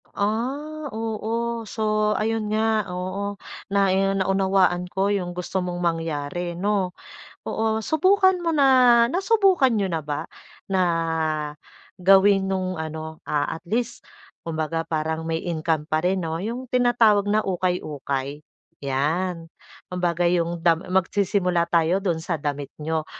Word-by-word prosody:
Ah, 275 Hz, +8 st, -2 dB
oo. 225 Hz, +1 st, -3 dB
So, 215 Hz, -1 st, 0 dB
ayun 215 Hz, 0 st, -1 dB
nga 220 Hz, 0 st, +2 dB
oo. 195 Hz, +3 st, -4 dB, 0.3 s
Nai 195 Hz, -1 st, +3 dB, 0.2 s
naunawaan 190 Hz, -1 st, +2 dB
ko 195 Hz, +1 st, 0 dB
yung 195 Hz, -3 st, -1 dB
gusto 180 Hz, +1 st, -3 dB
mong 175 Hz, -1 st, -4 dB
mangyari, 165 Hz, 0 st, -2 dB
'no? 190 Hz, +1 st, 0 dB, 0.5 s
Oo, 220 Hz, 0 st, 0 dB
subukan 370 Hz, -, +3 dB
mo 340 Hz, -, -1 dB
na 255 Hz, -6 st, +5 dB
nasubukan 380 Hz, -, +3 dB
niyo 215 Hz, -4 st, +1 dB
na 165 Hz, -4 st, -2 dB
ba 145 Hz, -1 st, -4 dB, 0.4 s
na 190 Hz, -1 st, +1 dB, 1.2 s
gawin 195 Hz, +1 st, +5 dB
nung 185 Hz, -1 st, -1 dB
ano, 160 Hz, -1 st, -6 dB
ah, 145 Hz, -1 st, -1 dB
at 165 Hz, -, -8 dB
least 235 Hz, +3 st, -2 dB, 0.4 s
kumbaga 165 Hz, 0 st, -2 dB
parang 160 Hz, 0 st, -3 dB
may 160 Hz, 0 st, -2 dB
income 160 Hz, -2 st, -1 dB
pa 155 Hz, 0 st, 0 dB
rin, 180 Hz, 0 st, 0 dB
'no, 160 Hz, +1 st, -3 dB
yung 235 Hz, +5 st, -4 dB
tinatawag 230 Hz, -5 st, +4 dB
na 215 Hz, +1 st, +2 dB
ukay-ukay? 150 Hz, -6 st, -2 dB, 0.4 s
'Yan, 165 Hz, +6 st, -1 dB, 0.5 s
kumbaga 175 Hz, -1 st, 0 dB
yung 170 Hz, 0 st, +1 dB
dam 165 Hz, -1 st, +4 dB
magsisimula 185 Hz, -2 st, +1 dB
tayo 170 Hz, +3 st, +2 dB
dun 175 Hz, -4 st, 0 dB
sa 165 Hz, +1 st, -2 dB
damit 145 Hz, -1 st, -3 dB
n'yo. 160 Hz, 0 st, -1 dB
190 Hz, 130 wpm, -24 LUFS, 165-220 Hz, 1.2 s, na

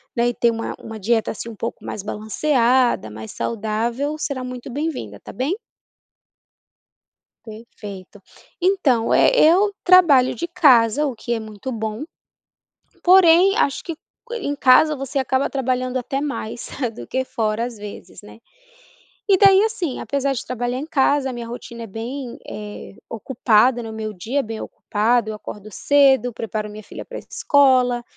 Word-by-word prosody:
daí 240 Hz, 0 st, +1 dB
ter 235 Hz, 0 st, +2 dB
uma 225 Hz, 0 st, -4 dB
uma 220 Hz, -1 st, -9 dB
dieta 225 Hz, +2 st, +1 dB
assim 230 Hz, +2 st, -7 dB
um 225 Hz, -, -9 dB
pouco 230 Hz, -, -6 dB
mais 205 Hz, -, -5 dB
balanceada, 235 Hz, -, +1 dB
mais 110 Hz, +1 st, -8 dB
saudável, 235 Hz, +7 st, -2 dB
será 270 Hz, -4 st, -3 dB
muito 250 Hz, 0 st, -7 dB
bem 300 Hz, +5 st, -1 dB
vinda, 105 Hz, -, -7 dB
tá -, -, -11 dB
bem? 275 Hz, -, -1 dB, 1.9 s
Perfeito. 210 Hz, -3 st, -11 dB, 0.4 s
Então, 315 Hz, -12 st, +2 dB
eh, -, -, +5 dB
eu 390 Hz, +3 st, +4 dB
trabalho 330 Hz, -9 st, +6 dB
de 340 Hz, -, -4 dB
casa, 285 Hz, -6 st, +4 dB
o 275 Hz, -, -2 dB
que 235 Hz, +2 st, -4 dB
é 230 Hz, -, -1 dB
muito 215 Hz, +3 st, -7 dB
bom, 220 Hz, +1 st, -4 dB, 1.0 s
porém, 365 Hz, +1 st, +6 dB
acho 280 Hz, -, 0 dB
que 335 Hz, -, -5 dB
que 480 Hz, +9 st, -12 dB
em 290 Hz, -10 st, -3 dB
casa 285 Hz, +3 st, +5 dB
você 275 Hz, +1 st, -5 dB
acaba 265 Hz, 0 st, 0 dB
trabalhando 255 Hz, -1 st, -1 dB
até 270 Hz, +2 st, -3 dB
mais 260 Hz, -6 st, -5 dB, 0.2 s
do -, -, -10 dB
que 260 Hz, 0 st, -2 dB
fora, 220 Hz, -1 st, -1 dB
às 240 Hz, -3 st, -7 dB
vezes, 205 Hz, 0 st, -10 dB
né. 210 Hz, +2 st, -14 dB, 0.9 s
E 390 Hz, -, +6 dB
daí 390 Hz, +1 st, +6 dB
assim, 405 Hz, -, -3 dB
apesar 280 Hz, -1 st, -1 dB
de 255 Hz, -, -5 dB
trabalhar 245 Hz, 0 st, -3 dB
em 285 Hz, -, -5 dB
casa, 280 Hz, -2 st, +2 dB
a -, -, -5 dB
minha 240 Hz, -1 st, -6 dB
rotina 235 Hz, 0 st, -8 dB
é -, -, -8 dB
bem, 235 Hz, +4 st, -6 dB
eh, 210 Hz, -1 st, -8 dB
ocupada, 235 Hz, +1 st, +2 dB
no 225 Hz, -, -7 dB
meu 215 Hz, -1 st, -5 dB
dia 225 Hz, +10 st, -2 dB
é -, -, -9 dB
bem 225 Hz, 0 st, -6 dB
ocupado, 220 Hz, +1 st, 0 dB
eu -, -, -5 dB
acordo 210 Hz, 0 st, -9 dB
cedo, 270 Hz, +1 st, +3 dB
preparo 215 Hz, -1 st, -4 dB
minha 210 Hz, +1 st, -10 dB
filha -, -, -9 dB
pra -, -, -8 dB
escola, 255 Hz, -4 st, +2 dB
245 Hz, 160 wpm, -21 LUFS, 220-285 Hz, 1.9 s, trabalho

